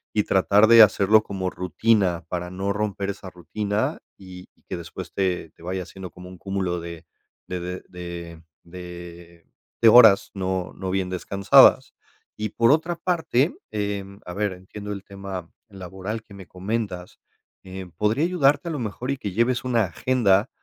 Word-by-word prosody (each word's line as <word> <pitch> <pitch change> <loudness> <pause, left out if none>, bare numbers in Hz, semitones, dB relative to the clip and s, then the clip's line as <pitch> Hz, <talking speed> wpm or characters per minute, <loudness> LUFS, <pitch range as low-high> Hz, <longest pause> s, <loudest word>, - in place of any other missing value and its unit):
Y 105 - +3
tratar 100 +3 +4
de 115 -1 +10
hacerlo, 105 +1 +4
como 95 -3 -3
rutina, 95 -1 +1
para 90 0 -4
no 100 +2 -2
romper 100 -1 -2
esa 95 -1 -7
rutina. 100 +5 -2 0.2
Y 90 -1 -12
y - - -34
que - - -3
después, 85 -1 -9
te 95 -2 -1
te 85 - -20
vaya 95 +1 -3
haciendo, 95 0 -10
como 90 0 -12
un 90 - -12
cúmulo 95 -2 -2
de 85 0 -9 0.4
de 90 -1 -4
de 90 +1 -5
de 85 -2 -8 0.2
de 85 -1 -11 0.4
de 115 - +8
horas, 110 -4 +7
no 95 -2 -2
no 95 -1 -4
bien 95 -1 -1
descansadas. 100 +1 +4 0.4
Y 105 0 -3
por 115 +4 +3
otra 165 +3 +1
parte, 165 -5 0 0.2
em, 100 -1 -4
a 90 - -7
ver, 105 -1 -1
entiendo 100 +3 -8
el 100 - -8
tema 95 -4 -8 0.2
laboral, 95 +3 -6
que 100 - -16
me 95 -2 -11
comentas. 95 -1 -4 0.4
Em, 95 -1 -9
podría 105 - 0
ayudarte, 155 -2 +2
a - - -3
lo 150 - -3
mejor, 120 +3 -4
y 140 - -2
que 100 -6 -5
lleves 120 +3 +1
una 120 -3 +2
agenda, 100 +2 +2
95 Hz, 170 wpm, -24 LUFS, 90-110 Hz, 0.4 s, de